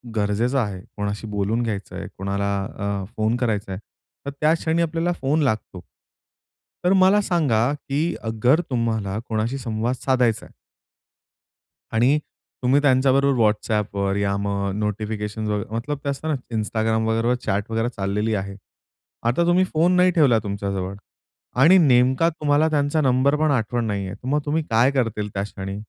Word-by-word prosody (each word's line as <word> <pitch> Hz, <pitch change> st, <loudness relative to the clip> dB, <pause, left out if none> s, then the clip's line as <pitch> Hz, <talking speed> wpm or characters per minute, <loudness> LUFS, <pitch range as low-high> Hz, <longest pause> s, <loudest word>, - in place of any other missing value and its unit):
गरजेचा 110 Hz, +6 st, +1 dB
आहे, 100 Hz, -3 st, -5 dB, 0.2 s
कोणाशी 105 Hz, +2 st, -3 dB
बोलून 105 Hz, +2 st, -1 dB
घ्यायचंय, 105 Hz, -4 st, -5 dB
कोणाला 100 Hz, +1 st, -2 dB
अ, 100 Hz, -1 st, -4 dB
फोन 110 Hz, +2 st, +1 dB
करायचा 110 Hz, -5 st, -1 dB
आहे, 95 Hz, -, -4 dB, 0.5 s
तर 140 Hz, -, -3 dB
त्या 155 Hz, +1 st, +4 dB
क्षणी 165 Hz, 0 st, 0 dB
आपल्याला 165 Hz, +1 st, 0 dB
फोन 145 Hz, +4 st, +1 dB
लागतो. 110 Hz, -7 st, -2 dB, 1.0 s
तर 180 Hz, -, +4 dB
मला 190 Hz, +2 st, +5 dB
सांगा 140 Hz, -, +1 dB
की 150 Hz, +3 st, -2 dB
अगर 120 Hz, +8 st, +2 dB
तुम्हाला 110 Hz, -5 st, -1 dB
कोणाशी 115 Hz, +4 st, -1 dB
संवाद 120 Hz, -1 st, -2 dB
साधायचाय? 125 Hz, -4 st, 0 dB, 1.4 s
आणि 125 Hz, +7 st, +3 dB, 0.4 s
तुम्ही 135 Hz, +3 st, +3 dB
त्यांच्याबरोबर 135 Hz, -1 st, +3 dB
WhatsAppवर, 105 Hz, -2 st, 0 dB
या 100 Hz, -1 st, 0 dB
मग 100 Hz, 0 st, -2 dB
नोटिफिकेशन 105 Hz, 0 st, -3 dB
वगैरे 105 Hz, 0 st, -3 dB
मतलब 140 Hz, +6 st, -3 dB
ते 140 Hz, -, -2 dB
असतं 140 Hz, +3 st, -4 dB
ना, -, -, +1 dB, 0.2 s
Instagram 110 Hz, +1 st, 0 dB
वगैरे 115 Hz, +2 st, +1 dB
चॅट 100 Hz, +3 st, -1 dB
वगैरे 115 Hz, +1 st, 0 dB
चाललेली 105 Hz, +2 st, -1 dB
आहे. 100 Hz, 0 st, -4 dB, 0.7 s
आता 120 Hz, +9 st, +2 dB
तुम्ही 175 Hz, +2 st, +4 dB
फोन 165 Hz, +3 st, +3 dB
नाही 180 Hz, 0 st, +5 dB
ठेवला 140 Hz, -10 st, +4 dB
तुमच्याजवळ 100 Hz, -2 st, -3 dB, 0.7 s
आणि 170 Hz, +7 st, +7 dB
नेमका 130 Hz, 0 st, +4 dB
तुम्हाला 155 Hz, -1 st, +1 dB
त्यांचा 145 Hz, 0 st, +1 dB
नंबर 135 Hz, +1 st, +3 dB
पण 155 Hz, -1 st, +2 dB
आठवण 120 Hz, -2 st, 0 dB
नाहीयेत. 100 Hz, -2 st, -3 dB
तर 125 Hz, -, -11 dB
मग 145 Hz, +3 st, +2 dB
तुम्ही 155 Hz, +2 st, 0 dB
काय 115 Hz, +4 st, +4 dB
करतील 115 Hz, -6 st, -1 dB
त्या 100 Hz, -, -2 dB
क्षणी? 95 Hz, -1 st, -6 dB
115 Hz, 150 wpm, -22 LUFS, 105-140 Hz, 1.4 s, आणि